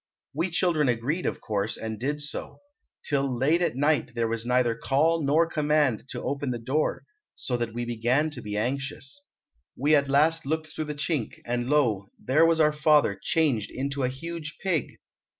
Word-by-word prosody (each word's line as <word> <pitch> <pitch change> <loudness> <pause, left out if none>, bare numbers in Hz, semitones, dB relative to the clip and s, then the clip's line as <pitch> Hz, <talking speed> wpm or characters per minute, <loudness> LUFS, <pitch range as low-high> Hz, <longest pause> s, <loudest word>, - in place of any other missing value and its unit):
"We 165 +6 -1
children 165 -5 +2
agreed, 125 +9 -1
of - - -3
course, 105 0 -1
and 110 -1 -5
did 145 +4 -2
so. 150 - -5 0.5
Till 135 -4 0
late 150 +8 +2
at 170 - 0
night 145 -3 +1
there 115 -1 +1
was 115 +1 0
neither 125 -1 +3
call 155 +8 +2
nor 150 +4 +4
command 150 -7 +1
to - - -4
open 140 0 -2
the 120 - -1
door, 130 +7 -1 0.3
so 125 - -2
that 115 -2 -3
we 120 0 -2
began 120 +6 +1
to - - -5
be 105 0 -4
anxious. 140 - -3 0.5
We 145 +4 +4
at 140 -1 +2
last 160 +4 +3
looked 155 +1 -3
through 155 - -3
the 150 0 -5
chink, 145 -5 -2
and 120 +1 -2
lo, 115 -10 +2
there 155 +6 +3
was 165 -1 +2
our 150 -1 +4
father 150 -7 +3
changed 135 - +1
into 140 +1 -3
a 125 - +1
huge 155 +3 -6
pig! 175 -8 0
140 Hz, 185 wpm, -26 LUFS, 120-155 Hz, 0.5 s, nor